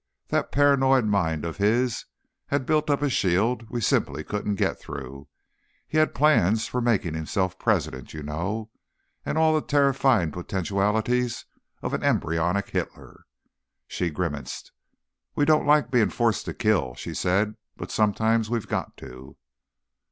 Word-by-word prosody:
"That - - 0
paranoid 135 -3 +4
mind 85 -7 0
of 85 - -5
his 115 +4 +1 0.4
had 140 -2 -1
built 155 +1 +1
up 145 0 +1
a 145 - +2
shield 110 +4 +1
we 120 +2 -3
simply 75 -6 0
couldn't 105 +2 -2
get - - -1
through. 70 -1 -8 0.6
He 155 - +1
had 155 - +2
plans 115 - +3
for 125 - -2
making 110 -9 +1
himself 95 +4 -2
president, 80 - -1
you 75 -1 -7
know—and 105 - -6
all 160 0 +4
the 155 - +2
terrifying 135 - +2
potentialities 105 +7 -1 0.4
of - - -3
an - - -1
embryonic 85 +5 0
Hitler." - - -5 0.6
She 90 - -2
grimaced. 75 -4 -5 0.6
"We 145 - +2
don't 155 -1 +3
like 145 -5 +4
being 115 -6 +3
forced 115 -4 0
to - - -5
kill," 100 - +1
she - - -6
said, 100 +4 +1 0.2
"but - - -7
sometimes 110 +1 +1
we've 115 -4 -2
got - - -3
to." 65 +1 -12
105 Hz, 145 wpm, -25 LUFS, 85-125 Hz, 0.6 s, paranoid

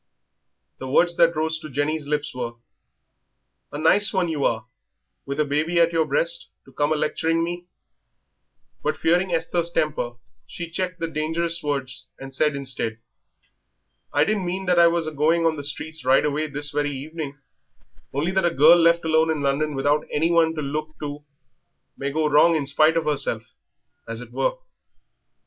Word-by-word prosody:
The 130 - -6
words 170 +6 +3
that 170 0 +4
rose 160 +1 -1
to 155 - -9
Jenny's 145 +2 -2
lips 150 0 -2
were: 120 -2 -4 1.2
"A 145 - -5
nice 195 +7 +3
one 185 -4 0
you 150 -3 -2
are, 110 0 0 0.6
with 140 +2 -4
a 150 - +3
baby 155 +4 0
at 170 0 +4
your 160 -1 +2
breast, - - 0 0.2
to - - -18
come 145 +1 0
a - - +3
lecturing 165 +2 0
me," 175 +1 -5 1.1
but, - - -1
fearing 180 +3 +2
Esther's 170 0 0
temper, 150 -7 -1 0.3
she 170 -1 -7
checked 180 +1 -3
the 165 - -2
dangerous 165 +2 -2
words 140 -4 -3
and 135 0 -10
said 150 +2 +1
instead 130 -5 -3 1.1
"I 145 - +3
didn't 200 0 -1
mean 190 +2 -3
that 180 -1 +3
I 170 - +8
was 170 -1 +1
a 155 - -3
going 160 +3 +2
on 160 -1 +2
the 145 - -6
streets 155 +2 -3
right 130 +3 +4
away 150 +1 -1
this 145 0 -3
very 145 -1 -1
evening, 150 0 -6 0.7
only 150 +6 -1
that 190 0 +1
a 175 - +4
girl 165 +2 +6
left 170 0 +4
alone 160 0 +3
in 155 -3 -1
London 145 +2 0
without 145 +2 +1
anyone 165 +1 +2
to 155 - -3
look 155 +2 -4
to 145 0 -5 0.7
may 140 - -3
go 155 +2 0
wrong 150 +3 +5
in 150 -3 -1
spite 155 +4 +3
of 165 - 0
herself, 135 -6 -1 0.6
as 115 0 -4
it 120 -1 -10
were." - - 0
155 Hz, 175 wpm, -23 LUFS, 145-170 Hz, 1.2 s, I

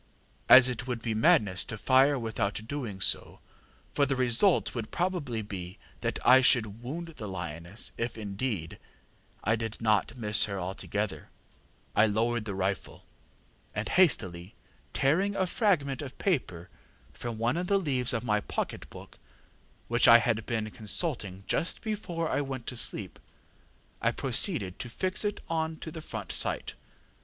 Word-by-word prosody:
As 130 -1 +10
it 125 0 -4
would 120 -3 -3
be 115 - -1
madness 105 -3 +3
to 115 - -6
fire 135 +5 +4
without 110 -4 -2
doing 120 -8 -5
so, - - 0 0.5
for 140 - +2
the 135 - 0
result 130 - +3
would 115 -2 -4
probably 170 -11 -2
be 95 -3 -7 0.2
that - - -2
I 130 +2 +8
should 115 -4 +2
wound 165 +8 -5
the 105 - -6
lioness, 85 +2 -4
if, 115 0 -3
indeed, 100 -4 -4 0.6
I 110 +3 +2
did 110 -1 -5
not 110 +2 +1
miss 105 -3 +6
her 100 -2 -4
altogether, 95 +3 -4 0.7
I 110 - +5
lowered 115 +2 0
the 100 -3 -4
rifle; 95 0 -3 0.7
and, - - -2
hastily 95 - +2 0.4
tearing 190 +9 +1
a 190 - +1
fragment 170 - +1
of 135 -3 -8
paper 110 - -2 0.4
from 120 -2 -5
one 115 +5 0
of 180 +1 -2
the 200 - +3
leaves 130 -9 +1
of 115 -3 -2
my 105 -3 +1
pocket - - -4
book, - - -13 0.7
which 120 0 +3
I 115 - +10
had 115 -2 -1
been 110 -2 -2
consulting 105 - -2
just 170 - -2
before 195 -7 -3
I 145 - 0
went 135 -3 -5
to 125 - -5
sleep, 100 -6 -1 0.8
I - - +3
proceeded 95 -2 0
to 120 - -5
fix 185 - -1
it 210 -1 -2
on 160 -1 -2
to 160 - -8
the 160 - -7
front 110 - -6
sight. - - 0
120 Hz, 155 wpm, -29 LUFS, 105-140 Hz, 0.8 s, As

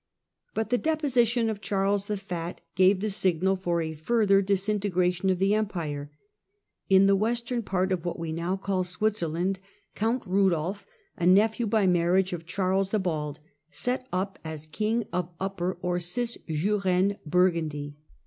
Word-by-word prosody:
But 220 +1 -2
the 245 - +3
deposition 250 -7 +2
of 215 -2 -3
Charles 195 +1 0
the 210 - -1
Fat 175 -3 -5
gave 185 +2 +4
the 215 0 -1
signal 190 0 +1
for 175 -3 -1
a 160 0 -4
further 200 +4 +3
disintegration 190 -2 0
of 185 - +2
the 195 +2 +2
Empire. 165 -9 -2 0.8
In 190 0 +6
the 195 0 +5
western 235 +3 -1
part 190 -2 -1
of 180 -3 -1
what 175 - -3
we 165 -1 -4
now 170 +4 -2
call 190 -1 -1
Switzerland 180 -1 -1 0.3
Count 230 +4 0
Rudolph, 190 -1 +1 0.3
a 175 - +1
nephew 220 +5 +4
by 210 -1 +2
marriage 180 +1 +2
of 165 -1 -6
Charles 190 +1 0
the 215 - +1
Bald, 155 -6 -2 0.3
set 255 +6 -2
up 190 +2 -2
as 160 -1 -6
king 215 +8 -1
of 180 -1 -1
Upper 185 -2 -2
or 180 0 0
Cisjurane 195 -1 0
Burgundy. 155 -4 0
190 Hz, 150 wpm, -27 LUFS, 175-210 Hz, 0.8 s, In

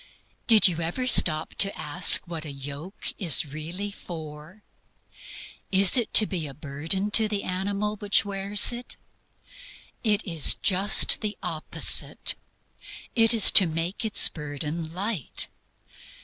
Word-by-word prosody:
Did 220 -3 +5
you 170 -2 -3
ever 175 +10 -4
stop 155 -10 +1
to 195 0 +5
ask 145 +3 +4
what 165 -2 -8
a 150 - -7
yoke 140 +7 -8
is 170 -5 +4
really 165 +8 -8
for? 160 +1 -12 1.1
Is 190 -1 +5
it 240 -4 -1
to 215 - +8
be 175 -7 -6
a 135 - -12
burden 160 +8 -3
to 220 0 +5
the 205 -2 -4
animal 200 +3 -4
which 205 0 0
wears 200 +3 0
it? 240 +1 -8 1.1
It 215 -2 -1
is 165 -6 +2
just 195 +2 +3
the 210 -2 -5
opposite. 165 -3 -1 0.8
It 225 -2 +3
is 230 -3 +5
to 190 - +6
make 165 +6 -5
its 220 -2 +2
burden 150 +2 -7
light. 190 - -4
185 Hz, 135 wpm, -24 LUFS, 155-205 Hz, 1.1 s, to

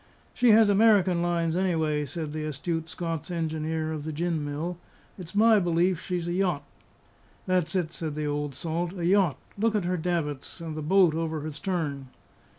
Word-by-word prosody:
"She 245 -1 +3
has 220 0 +7
American 200 -4 +4
lines, 170 -1 0
anyway," 160 -5 0
said 150 +1 -5
the 155 0 -3
astute 160 +2 -3
Scots 165 -1 -4
engineer 160 -1 -2
of 150 -2 -5
the 155 - -4
gin 165 0 -1
mill; 155 +5 -4 0.4
"it's 185 0 -10
my 220 0 +6
belief 175 0 +1
she's 175 -2 -3
a 175 - -1
yacht." 180 -6 0 0.8
"That's 180 -2 +1
it," 170 -3 -1
said 155 -3 -4
the 150 0 -2
old 145 -1 -2
salt, 170 +4 -3
"a 170 - -2
yacht! 185 -4 +3 0.2
look 225 +1 +2
at 200 -4 0
her 180 +1 0
davits, 160 -4 -3
and 165 -2 -6
the 155 - -4
boat 180 +1 +4
over 160 -1 -2
the 155 +1 -5
stern." 145 -5 -3
165 Hz, 180 wpm, -27 LUFS, 155-180 Hz, 0.8 s, has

